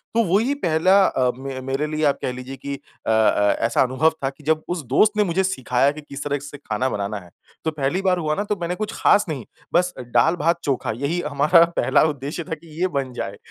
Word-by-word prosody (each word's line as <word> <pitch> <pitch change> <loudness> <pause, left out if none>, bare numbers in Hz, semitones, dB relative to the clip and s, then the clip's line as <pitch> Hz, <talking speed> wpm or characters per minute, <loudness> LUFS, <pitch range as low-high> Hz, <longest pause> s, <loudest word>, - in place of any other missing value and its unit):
तो 230 - +4
वही 215 +10 +2
पहला 175 - +2
अ, 125 -1 +1
मे 135 0 -6
मेरे 135 +3 -2
लिए 155 0 -2
आप 140 - +2
कह 125 - -1
लीजिए 130 +2 -7
कि 140 0 -5
अ, 135 - -11
अ, 105 -2 +3
ऐसा 115 - +2
अनुभव 130 +5 +2
था 135 - +1
कि 140 +2 -16
जब 155 +1 +1
उस 175 -2 -2
दोस्त 205 - +4
ने 210 - +5
मुझे 190 +1 0
सिखाया 135 -6 +1
कि 155 +1 -9
किस 140 -1 -8
तरह 145 -1 -1
से 145 +1 -9
खाना 125 -1 -2
बनाना 100 -2 -3
है। 90 -2 -16 0.4
तो 160 - +1
पहली 150 +5 -1
बार 185 -2 +2
हुआ 155 -2 0
ना 205 - -1
तो 210 0 -1
मैंने 175 +1 -2
कुछ 215 +1 -4
खास 205 - +4
नहीं 135 -7 -4 0.3
बस 180 +1 +2
दाल 125 +7 +2
भात 170 +2 +1
चोखा 135 -5 -1
यही 140 +7 -1
हमारा 150 +4 +5
पहला - - +3
उद्देश्य 150 +2 -2
था 160 -2 -4
कि 165 +2 -18
ये 185 - +3
बन 135 -6 -3
जाए। 100 -3 -5
145 Hz, 235 wpm, -22 LUFS, 130-170 Hz, 0.4 s, ने